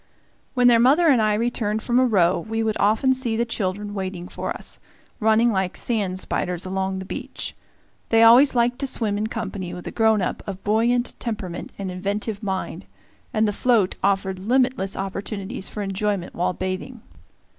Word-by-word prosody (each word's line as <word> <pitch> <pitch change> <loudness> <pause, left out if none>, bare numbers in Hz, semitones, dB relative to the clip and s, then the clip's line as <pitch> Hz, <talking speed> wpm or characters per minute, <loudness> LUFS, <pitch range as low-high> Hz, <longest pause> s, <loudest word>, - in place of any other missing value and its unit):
When 250 -1 +3
their 240 -1 +7
mother 295 +8 +5
and 255 -6 +5
I 215 -1 +2
returned 220 -1 -1
from 245 0 +2
a 255 - +4
row, 185 -5 +3
we 225 +5 -2
would 220 -1 0
often 220 +6 +3
see 245 -4 -1
the 235 - +1
children 205 -2 -3
waiting 185 -3 -4
for - - -5
us, - - -3 0.4
running 220 +1 +4
like 190 -3 -1
sand 200 -6 -1
spiders 180 -1 -2
along 190 0 -2
the 190 - -6
beach. - - -6 0.5
They 225 0 +5
always 250 +5 +7
liked 240 +1 +2
to 275 - -1
swim 220 -5 -1
in 210 +1 -1
company 195 -6 -5
with 180 - -9
a - - -4
grown 220 -3 +3
up - - -2
of 195 -1 -6
buoyant 235 +3 +1
temperament 210 -7 -5
and 195 -2 -4
inventive 200 +3 -3
mind, 190 -3 -4 0.4
and 220 0 +2
the 205 - 0
float 220 -4 +2
offered 195 -1 +1
limitless 240 -2 +1
opportunities 195 +2 -4
for 210 - -4
enjoyment 195 -1 -2
while 180 +1 0
bathing. 185 +7 -4
210 Hz, 175 wpm, -23 LUFS, 190-235 Hz, 0.5 s, their